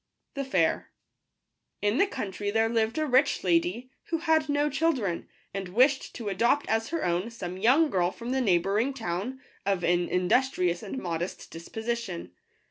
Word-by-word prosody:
p 275 - -3
Wht 275 - -5
§ - - -17
air* 165 -3 +2 0.9
*N 205 +7 +2
the 395 - +5
country 205 - -4
there 225 +2 +2
lived 225 +2 0
a 310 - +1
rich 265 0 +3
lady, 185 +8 +1
who 330 - -1
had 320 -2 +2
no 290 +1 +2
children, 275 - 0 0.2
and 195 -2 -4
wished 260 +8 +2
to 230 -3 -6
adopt 235 +9 +2
as 225 0 0
her 330 0 -2
own 175 +5 0
some 185 -6 -6
young 260 - +4
girl 175 -2 +2
from 235 +6 -6
the 265 0 +1
neighbouring 205 +6 +2
town, 220 +4 -3 0.2
of 195 -2 0
an 175 0 +2
industrious 180 -2 +1
and 215 +5 -6
modest 175 -4 -4
disposi 220 +8 -3
tion. 85 - -7
225 Hz, 175 wpm, -28 LUFS, 180-265 Hz, 0.9 s, the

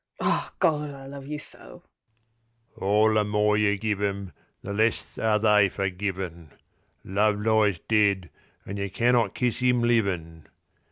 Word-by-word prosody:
…Ah, - - 0
Gawd, 150 -2 +1
I 135 -1 -10
love 140 0 -9
you 150 +1 -4
so! - - -12 0.9
All 105 +3 +2
the 105 -1 +3
more 105 0 +1
you 105 -1 +2
give 105 0 -2
'em 100 -2 -2 0.3
the 100 - -5
less 110 +2 -1
are 110 -1 +2
they 105 -2 +4
for 95 -1 -2
givin'—Love 95 +2 -4
lies 105 -3 +2
dead, 100 -5 +2 0.3
an' 100 - -6
you 100 0 -3
can 120 +6 +1
not 115 -5 +1
kiss 125 -1 -1
'im 125 -1 +3
livin'. 90 -9 -1
105 Hz, 150 wpm, -26 LUFS, 100-115 Hz, 0.9 s, they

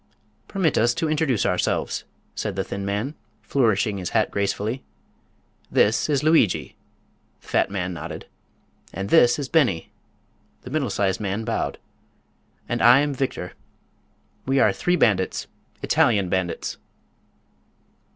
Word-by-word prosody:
"Permit 180 -6 +1
us 120 +1 +2
to 160 - -1
introduce 145 -9 +1
ourselves," 90 - -1 0.3
said - - -3
the - - -1
thin 100 0 -5
man, 105 +8 -2 0.3
flourishing 110 -5 +1
his 90 - -4
hat 110 - +1
gracefully. 100 +5 -2 0.9
"This 110 +6 +2
is 145 -2 +1
Lugui," 155 - +2 0.6
the - - -23
fat - - +1
man 90 -2 -3
nodded; 80 - -7 0.7
"and 95 +1 -5
this 120 -7 +6
is 145 -3 -3
Beni," 130 - +1 0.7
the 125 - -9
middle 145 -3 0
sized 95 -2 0
man 105 +1 -2
bowed; 115 - -2 0.9
"and - - -2
I 120 +4 +7
am 145 -1 0
Victor. 130 -9 -3 0.9
We 135 +1 +2
are 105 -7 +4
three 175 - +1
bandits—Italian 100 - 0
bandits." 90 -2 -2
110 Hz, 125 wpm, -23 LUFS, 100-135 Hz, 0.9 s, I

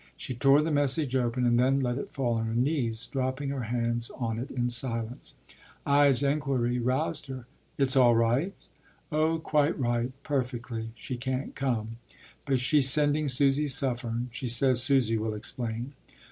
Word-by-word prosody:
She 130 - -5
tore 135 +4 +4
the 160 - -1
message 145 -1 +1
open, 125 0 0
and 120 0 +3
then 135 +2 +3
let 125 0 -1
it - - -6
fall 125 -4 -1
on 115 - -2
her 110 - -3
knees, 125 -3 0
dropping 135 +1 -3
her 135 -4 -3
hands 120 0 -2
on 115 -3 -3
it 130 +4 -5
in 125 -1 -2
silence. 120 -1 -3 0.5
Ide’s 140 -2 +4
enquiry 135 -4 0
roused 140 +6 -1
her: 130 -2 -7 0.3
“It’s 135 -1 +2
all 120 -3 +5
right?” 120 +11 +1 0.6
“Oh, 155 +2 +1
quite 150 -1 0
right. 120 0 0
Perfectly. 120 -5 -3
She 125 +1 -6
can’t 130 +2 -3
come; 115 -4 -2 0.5
but 135 -3 +1
she’s 135 +2 +4
sending 145 +1 +2
Susy 140 +2 +2
Suffern. 125 -3 -1
She 125 +2 -5
says 125 +1 +3
Susy 125 -4 +2
will 110 0 -2
explain. 120 +3 -5
130 Hz, 160 wpm, -28 LUFS, 120-140 Hz, 0.6 s, all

